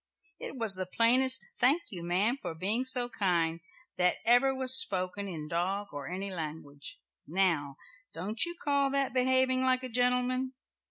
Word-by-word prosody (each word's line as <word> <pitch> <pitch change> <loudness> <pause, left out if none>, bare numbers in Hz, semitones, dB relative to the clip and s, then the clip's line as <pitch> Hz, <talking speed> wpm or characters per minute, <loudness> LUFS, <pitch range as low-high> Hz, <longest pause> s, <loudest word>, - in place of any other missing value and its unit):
It - - -8
was 225 -4 +1
the 185 -1 -6
plainest 250 +6 +3
'thank 285 +7 +3
you 180 -4 -8
ma'am 200 +10 -1
for 160 - -6
being 210 +9 -2
so 255 -2 0
kind,' 175 -8 -1 0.4
that 180 0 +1
ever 245 +4 +4
was 260 -1 +3
spoken 190 -2 +4
in 160 -5 -7
dog 190 +5 -3
or 145 -1 -8
any 195 +2 -6
language. 150 -4 -8 0.3
Now 160 -6 0 0.3
don't 200 +7 -3
you 345 0 -4
call 280 -1 0
that 275 -2 0
behaving 260 0 +2
like 260 0 0
a 255 - -5
gentleman?" 250 +2 -1
220 Hz, 160 wpm, -29 LUFS, 180-255 Hz, 0.4 s, ever